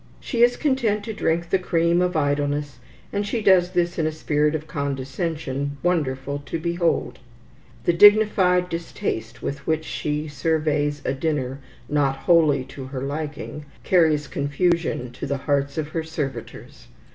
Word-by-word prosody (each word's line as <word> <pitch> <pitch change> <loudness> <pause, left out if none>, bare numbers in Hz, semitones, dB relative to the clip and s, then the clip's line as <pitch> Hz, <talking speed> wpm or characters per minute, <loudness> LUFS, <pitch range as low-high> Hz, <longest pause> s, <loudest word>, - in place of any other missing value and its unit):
She 235 -4 -2
is 245 0 +5
content 240 -8 +1
to 220 - -5
drink 170 -3 -1
the 190 - +3
cream 170 -1 +2
of 180 0 +1
idleness, 145 -2 -1 0.3
and 205 - 0
she 215 +3 -2
does 185 -3 +5
this 175 -1 0
in 160 - +2
a - - -1
spirit 150 0 0
of 155 0 -4
condescension, 140 0 -3
wonderful 145 -5 0
to - - -2
behold. 170 +1 -1 0.6
The 175 - +3
dignified 195 -2 +5
distaste 170 - -4
with 140 0 -5
which 160 0 0
she 150 0 -3
surveys 150 0 0
a - - +1
dinner 135 -2 -2 0.3
not 145 -2 +1
wholly 155 -5 +3
to 135 -1 -8
her 130 0 -5
liking, 150 +1 -5 0.2
carries 160 -5 +3
confusion 145 -2 0
to 125 - -6
the 140 0 -1
hearts 140 0 0
of 155 -1 -2
her 165 +1 -2
servitors. 155 -4 -6
155 Hz, 150 wpm, -23 LUFS, 145-175 Hz, 0.6 s, is